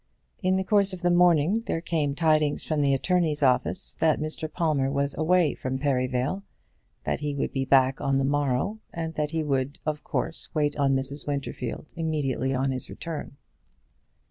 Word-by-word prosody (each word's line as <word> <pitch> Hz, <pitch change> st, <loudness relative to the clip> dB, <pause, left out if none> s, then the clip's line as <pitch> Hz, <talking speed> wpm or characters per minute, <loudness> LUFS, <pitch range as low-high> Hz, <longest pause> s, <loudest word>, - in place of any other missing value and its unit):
In 185 Hz, -1 st, +2 dB
the 190 Hz, -, +1 dB
course 200 Hz, -1 st, +3 dB
of 180 Hz, -1 st, -8 dB
the 175 Hz, -, +3 dB
morning 175 Hz, +3 st, +4 dB
there -, -, 0 dB
came 155 Hz, -4 st, -1 dB
tidings 155 Hz, -2 st, +2 dB
from 155 Hz, -2 st, 0 dB
the 140 Hz, -1 st, +3 dB
attorney's 160 Hz, -1 st, +1 dB
office 130 Hz, -2 st, +2 dB
that 160 Hz, -2 st, +2 dB
Mr. 155 Hz, 0 st, -3 dB
Palmer 150 Hz, -6 st, +1 dB
was 140 Hz, 0 st, 0 dB
away 165 Hz, +1 st, +3 dB
from 130 Hz, 0 st, -3 dB
Perivale, 130 Hz, +4 st, 0 dB, 0.6 s
that -, -, -1 dB
he 145 Hz, -1 st, -3 dB
would 140 Hz, -, -2 dB
be 135 Hz, -1 st, -1 dB
back 130 Hz, 0 st, +3 dB
on 135 Hz, -1 st, +1 dB
the 135 Hz, -, +1 dB
morrow, 145 Hz, +8 st, 0 dB
and 165 Hz, -1 st, -4 dB
that 150 Hz, -1 st, -1 dB
he 160 Hz, 0 st, -1 dB
would 140 Hz, -1 st, -1 dB
of 150 Hz, -1 st, -2 dB
course 165 Hz, -, -3 dB
wait 145 Hz, -1 st, +1 dB
on 140 Hz, -2 st, +2 dB
Mrs. 135 Hz, +2 st, -2 dB
Winterfield 140 Hz, -2 st, -4 dB
immediately 145 Hz, -6 st, -1 dB
on 135 Hz, 0 st, 0 dB
his 130 Hz, -2 st, -3 dB
return. 160 Hz, -4 st, -6 dB
145 Hz, 175 wpm, -26 LUFS, 135-165 Hz, 0.6 s, morning